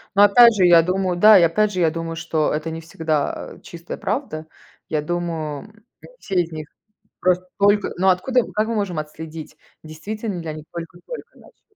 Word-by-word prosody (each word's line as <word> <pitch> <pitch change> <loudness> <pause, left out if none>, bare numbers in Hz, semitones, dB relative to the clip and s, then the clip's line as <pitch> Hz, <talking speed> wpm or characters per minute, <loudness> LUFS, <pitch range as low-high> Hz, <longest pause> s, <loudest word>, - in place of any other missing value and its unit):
Ну, 200 - +5
опять 235 +3 +7
же, 190 -3 +3
я 170 -1 +7
думаю, 185 +1 -1
да 210 +1 +8
и, - - +4
опять 210 +6 +2
же, 185 - -2
я 165 -2 +3
думаю, 165 0 -5
что 155 -2 -1
это 155 +2 -3
не 165 0 -6
всегда, 160 -2 -3
э, - - -21
чистая 170 0 -9
правда. 155 +1 -3 0.4
Я 155 -1 0
думаю, 165 -2 -4 0.4
не - - -14
все 190 -3 0
из 170 -1 -6
них 155 -1 -7 0.5
просто 180 0 +1
только 205 0 +3
ну, 190 +2 +3
откуда, 250 +8 +2
как 215 +1 0
мы 230 - -2
можем 195 -6 -2
отследить, 155 +1 -8 0.3
действительно 195 +6 -6
ли 165 - -8
они 155 -1 -6
только-только 175 - -9
начали? 420 - -22
175 Hz, 190 wpm, -21 LUFS, 160-200 Hz, 0.5 s, да